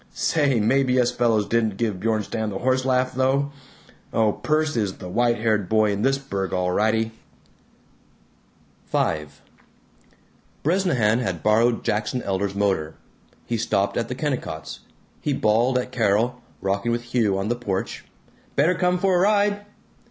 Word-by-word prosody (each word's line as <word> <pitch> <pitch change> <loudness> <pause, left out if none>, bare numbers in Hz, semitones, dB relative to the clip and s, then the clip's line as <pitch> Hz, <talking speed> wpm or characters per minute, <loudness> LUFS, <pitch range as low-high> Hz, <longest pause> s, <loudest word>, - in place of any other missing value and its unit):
Say, 145 -6 +2
maybe 130 +3 +2
us 120 -1 +3
fellows 115 -4 +1
didn't 110 -3 0
give 110 -5 -1
Bjornstam 110 +1 -1
the 95 - -4
horse 130 +2 +1
laugh 130 -1 +1
though! 135 +2 +1 0.6
Oh, 110 -2 +2
Perce 155 0 0
is 105 -5 0
the - - -8
white 120 +5 +1
haired 105 -4 0
boy 110 -1 +3
in 100 0 -2
this 135 +3 +2
burg, 100 -9 -4
all 90 0 0
rightee!" 110 +3 +1 1.8
V 75 -1 0 1.4
Bresnahan 140 - +2
had 95 -10 -3
borrowed 115 +2 +3
Jackson 110 +4 -1
Elder's 100 0 -2
motor; 95 -6 0 0.5
he 120 - -2
stopped 100 -3 0
at 115 - -1
the 125 - -4
Kennicotts'; 80 - -4 0.4
he 145 - 0
bawled 120 +2 +2
at 125 0 -3
Carol, 120 +1 +1 0.2
rocking 100 +4 0
with 120 0 -4
Hugh 110 -6 +2
on 95 +2 -2
the 120 - +1
porch, 100 -6 -4 0.5
"Better 155 +6 +3
come 180 +1 +1
for 190 0 +2
a - - +3
ride." 205 +1 +2
115 Hz, 150 wpm, -23 LUFS, 105-130 Hz, 1.8 s, us